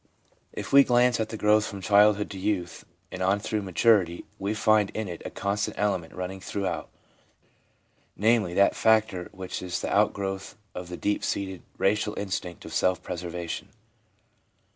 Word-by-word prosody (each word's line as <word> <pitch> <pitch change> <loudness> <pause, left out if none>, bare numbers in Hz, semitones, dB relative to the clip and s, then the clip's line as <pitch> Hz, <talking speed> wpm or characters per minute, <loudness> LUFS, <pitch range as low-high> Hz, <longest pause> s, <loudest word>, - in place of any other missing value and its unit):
If - - -7
we 140 0 +9
glance 125 -1 +3
at 110 - -1
the 110 - -5
growth 105 0 +3
from 100 - -7
childhood 105 +1 +4
to 95 - -7
youth 95 -3 -2 0.3
and 95 - -6
on 95 +2 +2
through 105 +1 -2
maturity, 95 -2 +2
we 100 +3 -2
find 105 -1 +3
in 110 -1 -2
it 85 -2 -7
a - - -3
constant 100 +1 -2
element 95 -5 -1
running 90 +1 -5
throughout, 90 -5 -3 1.3
namely, 105 -4 +2
that 100 - +4
factor 110 -5 +2
which 95 -1 -6
is 90 -1 -3
the - - -2
outgrowth 95 +1 0 0.2
of 90 -1 -7
the 90 - -6
deep 105 - -1
seated 95 -2 -2 0.2
racial 105 +1 +1
instinct 90 -3 -4
of - - -8
self 90 0 +1
preservation. 85 -1 -5
100 Hz, 160 wpm, -27 LUFS, 90-105 Hz, 1.3 s, we